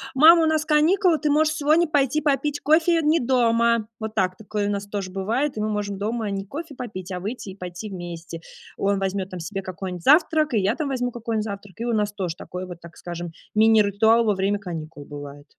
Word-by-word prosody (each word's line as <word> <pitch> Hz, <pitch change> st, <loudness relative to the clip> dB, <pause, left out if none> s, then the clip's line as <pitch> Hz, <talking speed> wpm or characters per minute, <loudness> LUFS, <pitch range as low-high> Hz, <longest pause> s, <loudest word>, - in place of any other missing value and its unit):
"Мама, 325 Hz, +4 st, +8 dB
у -, -, +4 dB
нас 315 Hz, -1 st, +1 dB
каникулы. 325 Hz, +3 st, +3 dB
Ты 300 Hz, -, 0 dB
можешь 310 Hz, +1 st, +3 dB
сегодня 310 Hz, +2 st, +3 dB
пойти 290 Hz, -1 st, +2 dB
попить 290 Hz, 0 st, 0 dB
кофе 330 Hz, +3 st, +3 dB
не 310 Hz, +1 st, +3 dB
дома". 235 Hz, -2 st, +2 dB
Вот 220 Hz, 0 st, -5 dB
так, 185 Hz, -2 st, +1 dB
такое 210 Hz, 0 st, -3 dB
у -, -, 0 dB
нас 200 Hz, 0 st, -3 dB
тоже 200 Hz, -2 st, -5 dB
бывает. 230 Hz, +10 st, -1 dB
И -, -, -1 dB
мы 215 Hz, -, -1 dB
можем 205 Hz, -1 st, -2 dB
дома 215 Hz, +1 st, -2 dB
не 195 Hz, 0 st, -3 dB
кофе 295 Hz, -, -7 dB
попить, 190 Hz, -7 st, -6 dB
а 180 Hz, -, -4 dB
выйти 210 Hz, -1 st, -5 dB
и -, -, -11 dB
пойти 180 Hz, +2 st, -7 dB
вместе. 170 Hz, -3 st, -7 dB, 0.3 s
Он 200 Hz, 0 st, 0 dB
возьмет 190 Hz, 0 st, -2 dB
там 185 Hz, -, -7 dB
себе 195 Hz, +4 st, -4 dB
какой-нибудь 185 Hz, -2 st, -6 dB
завтрак, 310 Hz, -1 st, +4 dB
и 215 Hz, -, +3 dB
я 200 Hz, +4 st, +1 dB
там 300 Hz, -3 st, -3 dB
возьму 250 Hz, -2 st, -1 dB
какой-нибудь 225 Hz, -2 st, -3 dB
завтрак. 200 Hz, -3 st, -7 dB
И 235 Hz, -, -3 dB
у 235 Hz, -, 0 dB
нас 210 Hz, -1 st, +1 dB
тоже 185 Hz, -5 st, -4 dB
такой 180 Hz, +1 st, -7 dB
вот, 175 Hz, -1 st, -10 dB
так 170 Hz, 0 st, -13 dB
скажем, 175 Hz, -1 st, -6 dB, 0.2 s
мини-ритуал 220 Hz, +1 st, +4 dB
во 210 Hz, -, +3 dB
время 195 Hz, +2 st, 0 dB
каникул 160 Hz, -5 st, -7 dB
бывает. 145 Hz, 0 st, -9 dB
210 Hz, 215 wpm, -23 LUFS, 190-275 Hz, 0.3 s, Мама